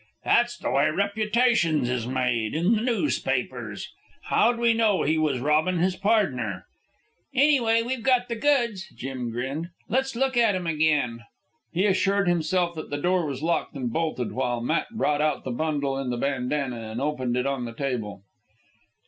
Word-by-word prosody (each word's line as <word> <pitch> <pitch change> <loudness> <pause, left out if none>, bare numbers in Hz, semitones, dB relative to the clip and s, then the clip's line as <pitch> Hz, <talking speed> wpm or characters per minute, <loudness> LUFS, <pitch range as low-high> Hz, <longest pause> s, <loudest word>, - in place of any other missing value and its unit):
"That's 240 +1 +3
the - - -3
way 140 +1 +3
reputations 200 - +1
is 120 -2 -2
made... 125 -3 -1
in 175 +8 +2
the 215 - +1
noospapers. 245 +5 -1 0.5
How'd 240 0 +3
we 235 -1 +3
know 220 -3 +2
he 155 +2 +1
was 155 -4 +1
robbin' 155 +6 +2
his 180 +2 +1
pardner?" 130 - 0 0.7
"Anyway, 245 -5 +4
we've 250 +1 -3
got 250 0 +2
the 235 - -3
goods," 235 -6 +1
Jim 130 -1 -4
grinned. 135 +8 -4 0.2
"Let's 265 +2 0
look 265 +1 0
at 225 -4 +4
'em 185 -1 -3
again." 150 -8 +1 0.5
He 180 +4 +1
assured 200 0 +2
himself 175 +1 +1
that 155 -2 -7
the 145 - -2
door 175 +2 +1
was 140 0 -5
locked 165 -1 -1
and 125 -4 -3
bolted, 155 -7 -1
while 125 -2 -1
Matt 140 +8 0
brought 150 -10 0
out 155 0 0
the 130 - -4
bundle 140 0 -1
in 135 -2 -3
the 120 - -2
bandanna 130 -1 -1
and 110 +2 -5
opened 130 -4 -1
it 125 - 0
on 135 -3 -1
the 115 - -6
table. 115 -8 -3
155 Hz, 170 wpm, -25 LUFS, 130-215 Hz, 0.7 s, Anyway